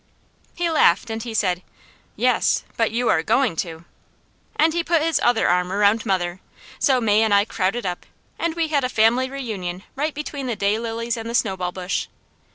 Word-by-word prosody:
He 345 Hz, 0 st, 0 dB
laughed, 230 Hz, -, +3 dB
and 225 Hz, 0 st, -3 dB
he 230 Hz, -1 st, -6 dB
said: 180 Hz, -4 st, +1 dB, 0.5 s
"Yes, -, -, +2 dB
but 225 Hz, -1 st, +1 dB
you'ah 230 Hz, -7 st, +1 dB
going 250 Hz, +2 st, +1 dB
to!" 165 Hz, -1 st, -4 dB, 0.7 s
And 315 Hz, +1 st, +3 dB
he 340 Hz, 0 st, 0 dB
put 330 Hz, -2 st, +2 dB
his 330 Hz, -1 st, +1 dB
other 240 Hz, -2 st, +3 dB
arm 180 Hz, +1 st, +1 dB
around 205 Hz, +3 st, +2 dB
mother, 180 Hz, -2 st, -1 dB, 0.4 s
so 265 Hz, -3 st, +3 dB
May 215 Hz, -2 st, +3 dB
and 220 Hz, -1 st, +2 dB
I 200 Hz, 0 st, +4 dB
crowded 220 Hz, +2 st, -1 dB
up, 180 Hz, -1 st, -4 dB, 0.3 s
and 335 Hz, -1 st, -1 dB
we 330 Hz, -2 st, 0 dB
had 285 Hz, -3 st, +1 dB
a 255 Hz, -, 0 dB
family 240 Hz, +3 st, +3 dB
reunion 200 Hz, -9 st, -5 dB
right 300 Hz, +2 st, -2 dB
between 285 Hz, -2 st, -5 dB
the 240 Hz, -, -1 dB
day 205 Hz, +2 st, +1 dB
lilies 230 Hz, +1 st, -3 dB
and 225 Hz, 0 st, -5 dB
the 235 Hz, -, -3 dB
snowball 190 Hz, -6 st, 0 dB
bush. 185 Hz, +1 st, -3 dB
225 Hz, 185 wpm, -22 LUFS, 190-260 Hz, 0.7 s, I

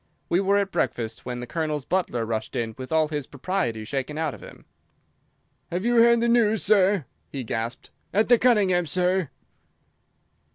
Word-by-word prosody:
We 175 Hz, -, +3 dB
were 200 Hz, +1 st, +2 dB
at 200 Hz, -1 st, 0 dB
breakfast 115 Hz, +1 st, -2 dB
when 125 Hz, -1 st, -4 dB
the -, -, -5 dB
Colonel's 155 Hz, -1 st, -3 dB
butler 165 Hz, -11 st, -1 dB
rushed 110 Hz, -1 st, -4 dB
in 115 Hz, -1 st, -2 dB
with 130 Hz, +3 st, -8 dB
all 160 Hz, -1 st, +2 dB
his 150 Hz, -3 st, -4 dB
propriety 140 Hz, -, -2 dB
shaken 140 Hz, +4 st, -3 dB
out 160 Hz, -3 st, -1 dB
of -, -, -12 dB
him. -, -, -13 dB, 1.1 s
"Have 180 Hz, +5 st, -2 dB
you 240 Hz, 0 st, +2 dB
heard 235 Hz, 0 st, +6 dB
the 235 Hz, -, +2 dB
news, 225 Hz, -3 st, +3 dB
sir?" 195 Hz, -5 st, +3 dB, 0.3 s
he 135 Hz, -2 st, -4 dB
gasped. 115 Hz, +1 st, -4 dB, 0.2 s
"At 215 Hz, +3 st, +2 dB
the 245 Hz, -1 st, +5 dB
Cunningham's 190 Hz, -9 st, +3 dB
sir!" 180 Hz, -1 st, +1 dB
165 Hz, 170 wpm, -25 LUFS, 125-200 Hz, 1.1 s, heard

